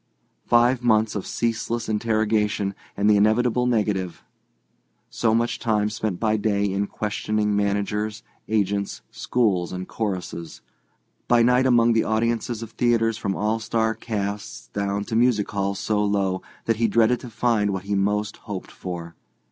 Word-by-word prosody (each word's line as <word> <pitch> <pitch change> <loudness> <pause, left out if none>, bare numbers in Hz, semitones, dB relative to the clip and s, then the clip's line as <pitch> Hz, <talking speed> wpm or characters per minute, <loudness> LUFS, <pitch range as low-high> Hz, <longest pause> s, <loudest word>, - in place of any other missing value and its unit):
Five 120 +1 +4
months 110 -3 +3
of 105 - -4
ceaseless 115 0 -2
interrogation 105 -2 0 0.2
and 100 +1 +2
the 105 -1 +6
inevitable 120 +4 +3
negative. 105 -6 -1 0.9
So 110 -1 +1
much 120 +1 0
time 105 -2 +1
spent 105 -4 -3
by 110 -1 +2
day 100 -1 +1
in 100 +1 -1
questioning 105 0 -1
managers, 105 +1 -1 0.2
agents, 100 -2 -1
schools 100 -8 0
and 90 0 -5
choruses; 90 -6 -4 0.7
by 120 -1 +5
night 125 +2 +4
among 120 -2 +4
the 115 - +3
audiences 115 +1 -1
of 115 - -9
theatres 115 -2 +1
from 95 -1 -2
all 110 +2 0
star 110 0 0
casts 100 - -5
down 100 +3 -2
to 110 - -4
music 115 -3 +2
halls 100 -1 -1
so 105 0 0
low 100 -2 0 0.2
that 115 -1 +1
he 115 0 +2
dreaded 115 +3 +3
to 125 - -9
find 115 -2 +1
what 95 -2 -3
he 100 +1 -3
most 105 +2 0
hoped 100 -3 -7
for. 85 -2 -7
105 Hz, 150 wpm, -24 LUFS, 100-115 Hz, 0.9 s, the